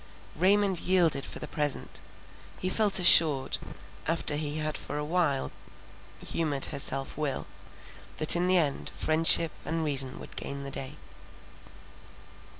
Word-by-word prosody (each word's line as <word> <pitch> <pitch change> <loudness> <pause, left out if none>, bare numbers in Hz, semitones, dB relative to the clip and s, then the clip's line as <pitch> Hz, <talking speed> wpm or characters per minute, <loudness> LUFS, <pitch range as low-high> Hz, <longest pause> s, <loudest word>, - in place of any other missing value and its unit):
Raymond 195 0 +2
yielded 175 -6 +1
for - - -7
the - - -7
present. 150 -3 -4 0.6
He 185 - -3
felt 210 -1 +3
assured, 155 -6 +5 0.5
after 160 -2 +1
he 150 0 -3
had 155 0 -3
for 145 - -5
awhile 150 -2 -1 0.7
humoured 150 -5 +1
her - - -4
self 135 0 0
will, 145 -3 -2 0.7
that 155 - +6
in 175 +1 0
the 185 0 +4
end 150 -5 -1
friendship 160 +1 +3
and 165 0 -3
reason 135 -3 -2
would - - -12
gain 140 0 -5
the 140 - -7
day. 135 -1 -7
155 Hz, 135 wpm, -28 LUFS, 140-175 Hz, 0.7 s, that